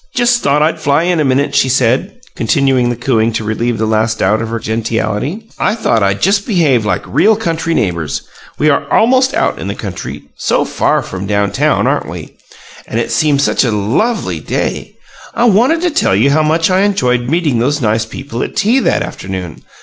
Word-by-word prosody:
"Just 240 -1 +2
thought 145 +2 +2
I'd 160 +1 0
fly 150 0 +1
in 175 -1 +1
a - - +2
minute," 140 +1 +1
she 130 - +2
said, 130 - +1 0.2
continuing 135 -5 +1
the 120 - -1
cooing 115 -2 0
to 110 - -2
relieve 115 +2 -1
the 110 - -1
last 110 0 0
doubt 110 +3 +1
of 115 - -4
her 115 - -2
gentiality. 115 - -3
"I - - +1
thought 115 - +1
I'd 100 0 0
just 200 +2 +2
behave 145 - +2
like - - -1
REAL 220 +1 +3
country 165 -5 -2
neighbors. 85 -6 -2 0.3
We 155 +1 +3
are 140 0 -1
almost 260 +4 +3
out - - 0
in - - -5
the 100 - -3
country, 95 -3 -7
so - - 0
far - - 0
from 95 +1 -6
down 100 -1 0
town, - - +1
aren't - - 0
we? - - -9 0.5
And 115 - -2
it 115 - -2
seemed 145 -3 +2
such - - +2
a 125 - +1
LOVELY 120 - -1
day! - - -3 0.4
I 235 - +2
wanted 245 - +3
to 355 - +1
tell 195 - +1
you 125 +8 +3
how 155 +2 +3
much 160 +3 +1
I 185 - +3
enjoyed 125 -12 +1
meeting 155 -6 +1
those 145 +5 0
nice 110 -2 0
people 120 0 -6
at - - -4
tea 220 +5 +2
that - - +1
afternoon. 95 -4 -7
135 Hz, 205 wpm, -14 LUFS, 110-175 Hz, 0.5 s, REAL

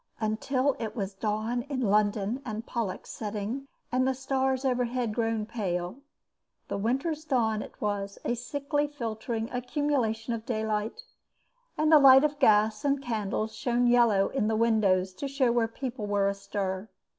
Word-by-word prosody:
Until 255 +5 0
it 220 -2 -4
was 200 -3 -3
dawn 215 +4 -1
in 275 -3 -2
London 210 +2 +1
and 220 -1 -5
Pollux 220 -6 -3
setting 215 +5 -4 0.2
and 255 +1 +2
the 265 - +1
stars 265 0 0
overhead 245 -2 0
grown 225 -1 0
pale. 185 -3 -3 0.7
The - - -2
Winter's 270 +8 -1
dawn 230 -7 +1
it - - -10
was, 200 -1 -2
a - - +1
sickly 285 +4 -1
filtering 225 -4 -4
accumulation 250 -3 -1
of 225 -1 -4
daylight, 220 - -2 0.7
and 310 +1 +2
the 310 - +9
light 270 0 +8
of 295 -1 0
gas 215 -3 +4
and 280 -1 +2
candles 220 -3 -2
shone 245 0 +1
yellow 235 -5 +4
in 240 -6 0
the 220 - +1
windows 205 -5 +2
to 280 +9 -5
show 270 -3 +2
where 235 -1 +2
people 240 -2 -5
were 200 -1 +2
astir. 195 0 -3
230 Hz, 155 wpm, -28 LUFS, 210-260 Hz, 0.7 s, the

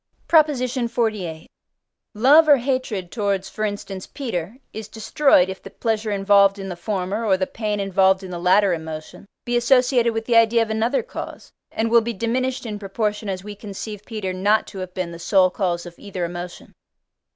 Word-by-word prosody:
PROP. 315 -2 +6
XLVIII. 235 - -2 0.7
Love 285 +9 +6
or 290 - +8
hatred 245 -8 -2
towards, 200 -3 -1
for 215 - -5
instance, 205 -2 -4
Peter 225 - -5 0.2
is 220 -1 -7
destroyed, 220 - +3
if 190 0 -7
the - - -10
pleasure 220 +1 -2
involved 200 0 +4
in 195 -1 -6
the 180 - -5
former, 195 +3 -3
or 195 -4 +3
the 185 - 0
pain 210 0 -3
involved 190 -1 +2
in 185 - -8
the 175 - -5
latter 185 +2 +4
emotion, 160 +3 -7 0.2
be 240 - -1
associated 245 -1 +3
with 225 0 -2
the 240 - +1
idea 230 0 +5
of 220 - -5
another 230 +5 0
cause: - - -8 0.2
and 225 0 -1
will 235 0 +6
be 235 +1 -3
diminished 250 +5 -2
in 210 -2 -5
proportion 210 +1 -2
as 185 -1 -4
we 210 0 -7
conceive 205 0 -7
Peter 210 -5 -4
not 205 +4 +2
to 195 - -9
have 185 -1 -7
been 180 -2 -3
the 170 - -9
sole 185 0 +3
cause 175 -3 -2
of 175 - -9
either 190 -4 -4
emotion. 175 +1 -8
205 Hz, 185 wpm, -22 LUFS, 190-230 Hz, 0.7 s, or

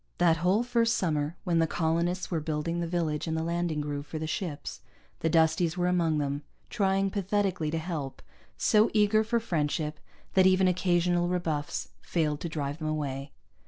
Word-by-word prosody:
That 170 -2 +4
whole 185 +7 +2
first 235 -1 +2
summer, 155 -1 -1
when 170 -3 +1
the 165 - +3
colonists 170 +3 0
were 165 - +1
building 155 +2 -2
the 170 - -1
village 165 -3 -1
and 160 0 -1
the 160 - -1
landing 170 -2 -1
groove 145 0 -4
for 160 - -5
the 155 - -3
ships, 160 -2 -4 0.4
the 165 - +1
Dusties 160 +1 +2
were 175 - +1
among 170 -3 +2
them, 145 0 -1 0.3
trying 195 -2 +1
pathetically 195 -4 0
to 165 - -1
help, 155 -5 -5 0.3
so 215 -1 +4
eager 215 +1 +4
for 235 +2 +1
friendship 155 -6 -1 0.3
that 190 -1 +6
even 190 0 +4
occasional 175 -1 +2
rebuffs 165 -5 -2
failed 150 -4 -1
to 170 - -4
drive 145 -1 -3
them 155 - -3
away. 140 -2 -3
170 Hz, 175 wpm, -29 LUFS, 155-185 Hz, 0.4 s, that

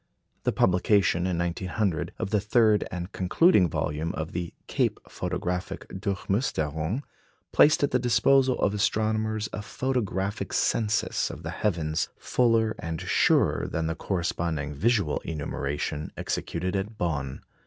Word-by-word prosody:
The - - +3
publication, 90 -1 +3
in 90 -2 -1
1900, 85 +1 -1
of 95 - -3
the 105 - +3
third 105 -1 +3
and 90 +2 -5
concluding 95 - +4
volume 75 +2 -2
of 80 +1 -4
the 85 -1 -4
"Cape - - 0
Photographic 90 +1 -3
Durchmusterung" 95 - -1 0.5
placed 150 0 +5
at 140 - +2
the 125 - +3
disposal 130 +2 +3
of 100 - +1
astronomers 110 +1 0
a 105 - -3
photographic 105 -5 -2
census 105 -1 +1
of - - -8
the - - -4
heavens 80 -6 -1
fuller 115 -3 +2
and 80 -1 -4
surer - - +2
than 80 - -2
the 80 - 0
corresponding 85 -5 -2
visual 100 - +1
enumeration 75 -1 -3
executed 90 +3 -2
at 105 +3 -3
Bonn. 70 -6 -2
95 Hz, 130 wpm, -27 LUFS, 80-110 Hz, 0.5 s, placed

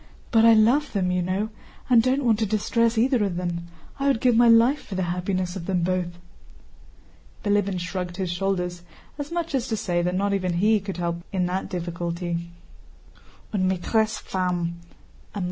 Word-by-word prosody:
"But 225 -1 +5
I 230 -1 +8
love 250 +7 +3
them, 185 -3 +1
you 180 0 +1
know, 190 +5 -1 0.4
and 245 -3 +6
don't 255 +3 +1
want 225 -3 +3
to 220 - +1
distress 230 +2 +1
either 245 0 +3
of 195 -4 -1
them. 170 -1 -3 0.3
I 275 - 0
would 275 -5 +2
give 250 -2 +3
my 240 +1 +6
life 235 +5 +5
for 200 - -7
the 185 - 0
happiness 180 0 -2
of 170 -3 -6
them 180 -3 0
both." 180 -1 -1 1.3
Bilíbin 205 -2 +1
shrugged 180 0 -4
his 185 -3 -2
shoulders, 180 -1 -2 0.4
as 290 +1 -5
much 340 -3 -3
as 260 -2 0
to 220 - -1
say 175 -5 0
that 180 +1 -1
not 200 +1 +1
even 185 -2 0
he 210 +5 +3
could 195 -2 -6
help 170 -1 -1
in 185 -2 0
that 185 +2 -2
difficulty. 170 -1 -3 1.0
"Une 185 -2 +1
maîtresse 220 +4 0
femme! 175 -2 -2
190 Hz, 180 wpm, -24 LUFS, 180-225 Hz, 1.3 s, I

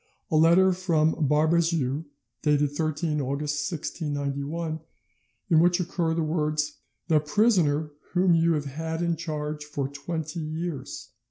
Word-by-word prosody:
a - - +2
letter 170 +4 +6
from 165 -4 +2 0.2
Barbezieux, 155 -1 +2 0.4
dated 150 -2 +2
13th 155 0 -1
August 145 +4 -2
1691, 150 0 -3 0.7
in 160 - +6
which 175 +2 +4
occur 170 -2 -1
the 165 - 0
words, 150 -1 -1 0.3
"THE 160 -3 +4
PRISONER 155 -3 +2 0.2
WHOM 180 -1 +4
YOU 165 0 +4
HAVE 150 -2 -1
HAD 160 +4 -4
IN 170 -1 +1
CHARGE 150 -2 -4
FOR 145 -2 -3
TWENTY 160 +2 -5
YEARS." 155 -3 -5
155 Hz, 125 wpm, -26 LUFS, 150-170 Hz, 0.7 s, letter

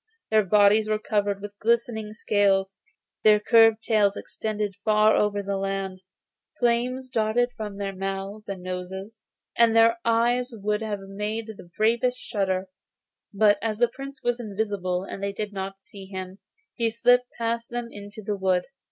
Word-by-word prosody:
Their 215 -1 +5
bodies 210 +2 +4
were 215 - +2
covered 205 -2 -1
with 205 0 -8
glittering 225 -2 0
scales; 195 -3 +2 0.5
their 215 -1 +6
curly 225 0 +6
tails 210 -2 +2
extended 210 -2 -3
far 215 0 +4
over 205 -1 +1
the 200 0 -2
land; 195 -1 -3 0.6
flames 245 +2 0
darted 245 0 +1
from 210 -3 -6
their 195 -1 -4
mouths 195 +2 -5
and 190 -2 -5
noses, 190 +4 -6 0.3
and 230 -1 +4
their 230 +1 +5
eyes 240 +2 +2
would 210 0 -1
have 210 -2 -3
made 210 +3 -4
the 175 - -14
bravest 235 +3 +2
shudder; 190 -5 -2 0.6
but 205 0 +4
as 220 -2 -1
the 240 +1 +3
Prince 275 +2 -9
was 240 0 0
invisible 200 -4 -2
and 195 - -7
they 200 0 -2
did 210 0 -5
not 195 0 -6
see 195 -2 -12
him, 190 0 -7 0.3
he 230 -2 0
slipped 245 +2 +3
past 230 0 -2
them 240 -1 -4
into 205 +1 -10
the 205 +1 -2
wood. 185 -2 +1
210 Hz, 160 wpm, -25 LUFS, 195-230 Hz, 0.6 s, their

